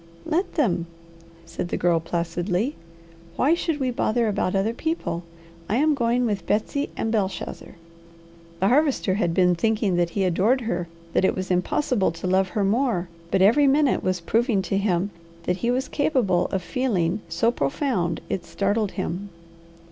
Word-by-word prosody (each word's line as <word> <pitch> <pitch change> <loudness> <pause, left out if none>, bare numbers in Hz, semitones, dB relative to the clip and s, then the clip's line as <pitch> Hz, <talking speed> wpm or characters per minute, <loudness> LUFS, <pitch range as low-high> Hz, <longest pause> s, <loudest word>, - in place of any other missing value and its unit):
"Let 350 +5 -1
them!" 180 - +1 0.6
said 175 - -4
the - - -1
Girl 170 -1 +2
placidly. 175 - -2 0.6
"Why 290 +5 +3
should 330 -3 -1
we 260 -2 0
bother 235 -1 +1
about 200 -2 0
other 200 +4 +1
people? 320 - -2 0.5
I 215 - +1
am 305 +4 +3
going 245 -2 +1
with 200 -6 -2
Betsy 280 +7 0
and 225 - -1
Belshazzar." 200 -4 -3 0.8
The 190 - +3
Harvester 270 -6 +2
had 175 -4 0
been 180 -1 +4
thinking 210 0 +1
that 175 -1 +2
he 195 +3 -1
adored 195 +9 +2
her, 175 -7 -2 0.3
that - - +2
it - - +3
was 185 0 -3
impossible 195 - +1
to 165 +2 -7
love 190 +1 +2
her 205 - +2
more, 205 -4 +1 0.2
but 190 +1 +3
every 275 +9 +5
minute 280 0 +3
was 185 -1 0
proving 225 +2 +1
to 195 +2 -1
him 195 -1 0 0.3
that 180 - 0
he 235 - -1
was 255 +2 0
capable 245 - +1
of 190 -2 -3
feeling 210 -8 0
so 170 +8 +2
profound 175 - -1
it 180 - -3
startled 200 +4 -1
him. 190 +1 -4
200 Hz, 165 wpm, -24 LUFS, 180-245 Hz, 0.8 s, every